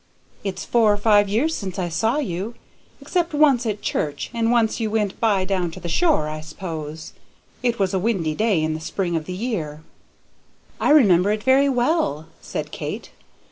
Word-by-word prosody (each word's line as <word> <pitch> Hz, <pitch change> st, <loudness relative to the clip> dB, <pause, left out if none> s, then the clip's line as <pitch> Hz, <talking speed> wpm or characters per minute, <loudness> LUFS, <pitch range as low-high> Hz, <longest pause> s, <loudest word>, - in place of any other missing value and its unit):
It's 195 Hz, -2 st, -4 dB
four 225 Hz, -3 st, +4 dB
or 205 Hz, -, +1 dB
five 205 Hz, -1 st, +4 dB
years 260 Hz, +11 st, +1 dB
since 190 Hz, -3 st, -5 dB
I 180 Hz, -2 st, -1 dB
saw 220 Hz, -, 0 dB
you, 220 Hz, -, -3 dB, 0.4 s
except 345 Hz, -4 st, -1 dB
once 275 Hz, -5 st, +4 dB
at 210 Hz, -1 st, -3 dB
church, 145 Hz, -1 st, -2 dB
and 230 Hz, 0 st, +1 dB
once 235 Hz, -2 st, +2 dB
you 220 Hz, -2 st, -1 dB
went 210 Hz, -2 st, -1 dB
by, 205 Hz, -5 st, +2 dB
down 185 Hz, -2 st, 0 dB
to 165 Hz, -, -9 dB
the 175 Hz, -, -6 dB
shore, 300 Hz, -, +2 dB
I 155 Hz, 0 st, -5 dB
suppose. 155 Hz, -1 st, -7 dB, 0.5 s
It 240 Hz, -2 st, 0 dB
was 195 Hz, -2 st, 0 dB
a 190 Hz, -, +1 dB
windy 185 Hz, -7 st, 0 dB
day 200 Hz, -3 st, +1 dB
in 155 Hz, 0 st, 0 dB
the 155 Hz, -, -4 dB
spring 175 Hz, +2 st, -2 dB
of 160 Hz, -1 st, -2 dB
the 185 Hz, -, -5 dB
year." 170 Hz, -9 st, -4 dB, 1.0 s
"I -, -, +1 dB
remember 205 Hz, -, +5 dB
it 210 Hz, 0 st, -2 dB
very 270 Hz, +3 st, +4 dB
well," 245 Hz, -, +1 dB, 0.2 s
said -, -, -5 dB
Kate. -, -, -6 dB
205 Hz, 185 wpm, -22 LUFS, 170-235 Hz, 1.0 s, remember